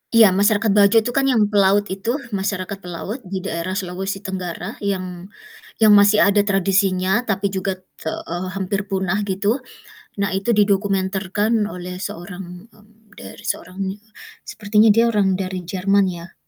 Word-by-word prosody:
Iya, 220 -4 +8
masyarakat 210 +1 +3
Bajo 200 +1 +4
itu 245 - -2
kan 275 - +3
yang 250 -5 +3
pelaut 200 0 +4
itu, 200 +6 -2 0.2
masyarakat 195 -1 -3
pelaut, 185 +6 -6
di 190 0 -4
daerah 185 0 -3
Sulawesi 190 +1 -4
Tenggara, 185 0 -5
yang 185 -3 -4 0.5
yang 215 -2 +6
masih 205 +1 +6
ada 205 +1 +4
tradisinya, 195 +1 +1
tapi 205 -4 -1
juga, 190 0 -2 0.2
te 160 - -2 0.2
eee, 175 +2 -4
hampir 195 0 -2
punah 190 +1 0
gitu, 205 +6 -1 0.6
nah, 200 -1 0
itu 195 +4 -1
didokumenterkan 200 0 +1 0.2
oleh 180 0 -7
seorang 180 +1 -8
mmm, 215 0 -24
dari 210 - -11
seorang 185 -3 -4
ne 190 - -3 0.6
sepertinya 215 0 +3
dia 230 +3 +4
orang 200 -5 +1
dari 185 -1 -4
Jerman, 195 +1 +2
ya. 170 +2 -12
195 Hz, 150 wpm, -20 LUFS, 185-210 Hz, 0.6 s, Iya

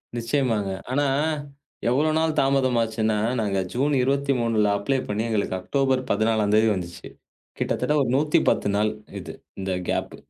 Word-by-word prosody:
நிச்சயமாங்க. 115 -4 0 0.2
ஆனா 145 +2 +1 0.8
எவ்வளவு 150 +5 +2
நாள் 160 -1 +1
தாமதமாச்சுன்னா, 115 -5 +1 0.2
நாங்க 100 -3 0
ஜூன் 140 +4 +1
23ல 125 -5 +1
அப்ளை 135 +6 0
பண்ணி 105 +2 -1
எங்களுக்கு 100 -4 -1
அக்டோபர் 135 +3 +1
14ம் 110 0 +1
தேதி 110 +1 +4
வந்துச்சு. 85 -2 -7 0.5
கிட்டத்தட்ட 150 - 0
ஒரு 125 - -2
110 150 -6 +2
நாள் 105 +1 +2 0.3
இது. - - -8 0.3
இந்த 95 0 -3 0.2
கேப். - - -2
115 Hz, 130 wpm, -24 LUFS, 105-135 Hz, 0.8 s, தேதி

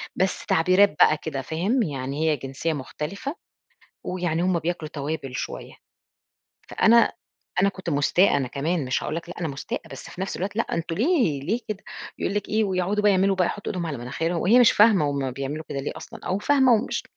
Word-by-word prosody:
بس 190 0 -1
تعبيرات 185 +5 +4
بقى 155 - +6
كده 140 -3 -4
فاهم 195 - 0
يعني 140 0 -2
هي 150 - +1
جنسية 135 +5 -3
مختلفة، 165 - -5 0.7
ويعني 175 -2 -1
هم 185 -1 +2
بياكلوا 165 -1 -3
توابل 145 -3 -4
شوية، - - -5 1.0
فأنا 230 +1 +4 0.5
أنا 200 - +4
كنت 190 -3 -5
مُستاءة 145 +6 +3
أنا 135 -3 -1
كمان 150 +4 -1
مش 130 0 -1
هاقول 155 - -3
لك 170 - -6
لأ، 175 - -7
أنا 165 - -1
مستاءة 140 -1 -5
بس 135 - -9
في - - -10
نفس 190 - -3
الوقت 200 +3 -4
لأ 225 - +3
أنتم 165 0 -2
ليه 235 - +2
ليه 215 - -1
كده 215 -1 -5 0.3
يقول 200 - -2
لِك 205 -1 -2
إيه 215 0 +2
ويقعدوا 195 +2 0
بقى 210 - +5
يعملوا 195 0 +2
بقى 180 - +2
يحطوا 205 - -4
إيدهم 175 -3 -3
على 140 -5 -4
مناخيرهم، 165 +8 -2
وهي 230 +7 +5
مش 240 - +6
فاهمة 205 -9 +5
هم 135 -2 -2
بيعملوا 140 +4 -5
كده 140 - -3
ليه 135 - -4
أصلًا، - - -10
أو 185 +2 0
فاهمة 265 +1 +4
ومش 225 +2 0
175 Hz, 200 wpm, -24 LUFS, 145-200 Hz, 1.0 s, بقى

